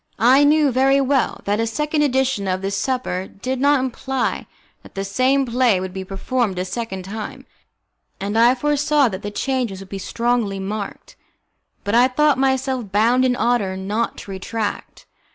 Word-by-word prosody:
I 255 +6 +5
knew 295 -1 +4
very 270 +2 +3
well 275 -1 +1
that 205 +1 0
a 230 - +1
second 300 +6 -1
edition 265 -7 +1
of 185 0 -1
the 195 - -1
supper 200 -3 -2
did 255 +5 -4
not 285 0 +4
imply 260 +1 -2 0.3
that - - -17
the 195 - -2
same 255 +7 +2
play 240 -5 +2
would 185 0 -5
be 190 0 -5
performed 195 +2 -2
a 180 - -1
second 190 -2 -5
time, 220 +6 -7 0.7
and 200 +2 -3
I 235 +3 +5
foresaw 290 0 +2
that 190 -1 -6
the 205 - -4
changes 240 -3 -2
would 195 -1 -11
be 195 - -5
strongly 230 -1 -1
marked. 200 +1 -6 0.7
But 205 - -2
I 245 +2 +6
thought 290 +2 +2
myself 265 -4 0
bound 230 +5 +3
in 255 -1 +2
honour 220 -6 0
not 210 +5 -2
to 200 - -9
retract. 205 +3 -5
235 Hz, 170 wpm, -21 LUFS, 195-265 Hz, 0.7 s, I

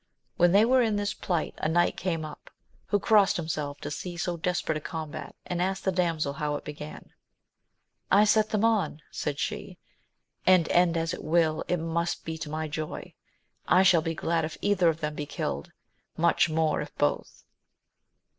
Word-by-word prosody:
When 175 0 +4
they 205 +4 +6
were 255 +2 +4
in 220 -3 +1
this 205 0 -1
plight 175 -6 -2
a 155 - 0
knight 175 +2 +2
came 165 -4 -2
up, 155 - -11 0.4
who 205 - +2
crossed 205 -1 +4
himself 150 -4 -3
to 145 - -5
see 175 +4 -5
so 175 0 -1
desperate 170 -2 -1
a - - -19
combat, 155 0 -6
and 175 -1 -2
asked 190 +1 -1
the 190 - +3
damsel 165 -5 0
how 150 0 -2
it - - -5
began. 150 0 -8 1.0
I 200 +2 +6
set 215 0 +3
them 215 0 +1
on, 190 -9 +1
said 145 -1 -3
she, - - -4 0.7
and 185 -3 +5
end 175 -1 +3
as 165 0 -1
it - - -6
will, 155 0 +2
it 180 - +1
must 170 +1 -2
be 160 - -3
to 155 - -5
my 155 +1 -3
joy: 155 +1 -5 0.5
I 185 +2 +5
shall 185 -4 +5
be 165 0 -3
glad 165 +1 0
if 155 0 -4
either 190 -4 +3
of 160 +1 -2
them 150 0 -2
be 150 -1 -5
killed, 70 - -4 0.5
much 170 0 +3
more 155 -1 +1
if - - -8
both. - - -1
165 Hz, 185 wpm, -27 LUFS, 155-185 Hz, 1.0 s, they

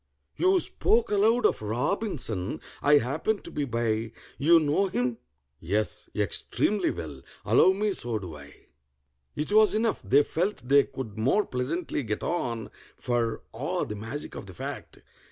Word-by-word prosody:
You 370 +1 +4
spoke 445 +6 +1
aloud 220 +4 +3
of - - +2
ROBINSON—I 125 - 0
happened 150 - -1
to - - -9
be 145 - -2
by. 115 -2 -1 0.3
You 165 +4 +6
know 155 +6 +2
him?" 125 -9 -1 0.4
"Yes, 100 +3 -2
extremely 205 -3 0
well." 75 -6 -6 0.2
"Allow 185 - +5
me, 205 +1 0
so 120 -9 -3
do 90 -6 -7
I." 75 -1 -14 0.7
It 150 +6 -3
was 215 0 +5
enough: 220 0 +1
they 140 +2 +5
felt 175 -5 -2
they 140 +1 +6
could 120 -6 -7
more 135 - +2
pleasantly 145 +6 -2
get 110 -4 -3
on, 115 -10 -2 0.3
For 120 -2 -1
(ah, - - -1
the 105 - -5
magic 115 +8 -5
of - - -8
the 95 - -10
fact!) - - -6
135 Hz, 150 wpm, -27 LUFS, -, 0.7 s, You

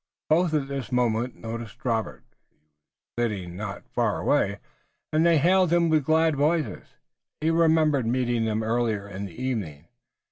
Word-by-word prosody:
Both 160 0 +3
at 140 -3 0
this 135 -2 -5
moment 120 0 0
noticed 115 +1 -8
Robert, 115 -3 -2 0.3
who - - -43
was 75 0 -45 0.5
sitting 95 -6 -3
not 100 +1 -6
far - - -1
away, - - +1 0.6
and 155 +1 +3
they 170 -1 +5
hailed 180 +3 +3
him 170 -1 +3
with 155 -3 +2
glad 160 0 +3
voices. 150 - -1 0.4
He 160 +1 +1
remembered 160 -6 +3
meeting 120 -1 0
them 110 0 -1
earlier 110 -3 -1
in 100 0 -6
the 85 -4 -10
evening. 95 - -4
125 Hz, 155 wpm, -25 LUFS, 110-155 Hz, 0.6 s, they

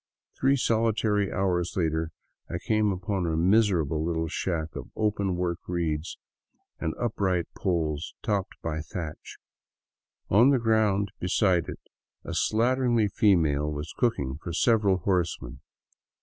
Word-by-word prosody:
Three 135 +1 +4
solitary 110 -4 +1
hours 90 -2 0
later 80 -2 0 0.4
I - - -3
came 110 -1 +1
upon 95 -1 -2
a 80 -1 0
miserable 85 -5 +2
little 80 0 -1
shack 80 -2 -3
of - - -7
open 100 -3 0
work 85 -1 -1
reeds 85 -3 -2 0.6
and 80 - -2
upright 95 -7 0
poles 80 -4 -2
topped 100 -3 -2
by 80 -1 -2
thatch. 80 -1 -7 0.9
On 115 +7 +5
the 140 - +4
ground 110 -4 +2
beside 90 -2 +2
it - - -7 0.4
a - - -6
slatternly 120 -1 +2
female 80 -10 +2
was 75 +2 -5
cooking 70 - 0
for 85 - -5
several 105 0 +3
horsemen. 85 -9 -1
90 Hz, 125 wpm, -27 LUFS, 80-105 Hz, 0.9 s, On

